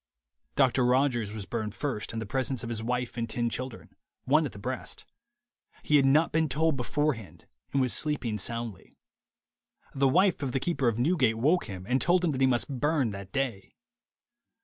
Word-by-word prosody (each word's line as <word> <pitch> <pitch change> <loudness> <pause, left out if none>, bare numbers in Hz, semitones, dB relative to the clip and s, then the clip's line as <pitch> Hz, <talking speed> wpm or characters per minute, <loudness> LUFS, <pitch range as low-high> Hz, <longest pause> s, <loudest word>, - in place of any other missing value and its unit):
Doctor 130 -2 +3
Rogers 125 -4 +2
was 105 -2 -6
burned 110 -2 -4
first, 130 -7 -3
in 115 - -4
presence 130 +2 -1
of 115 - -4
his 115 -2 -3
wife 125 +1 -2
and 115 -1 -2
ten 120 0 -1
children, 130 -2 -5 0.3
one 150 +3 +3
at - - -10
the - - -12
breast. 100 - -5 0.8
He 150 - +4
had 135 -1 +4
not 150 +4 +4
been 160 -1 +1
told 160 +2 +1
beforehand, 125 - -2 0.3
and 140 - +1
was 130 -2 +2
sleeping 130 -8 -1
soundly. 115 -1 -5 1.0
The 135 0 +3
wife 185 +5 +3
of 135 -3 -2
the 135 - +1
keeper 140 -4 0
of 115 -2 +1
Newgate 130 -4 +2
woke 155 +10 +2
him, 95 -4 -7
and 130 +2 +1
told 180 +1 +3
him 165 - +2
that 135 -2 -3
he 130 - +5
must 130 +1 0
burn 145 -5 +1
that 100 -1 -8
day. 120 -8 -3
130 Hz, 185 wpm, -28 LUFS, 115-145 Hz, 1.0 s, he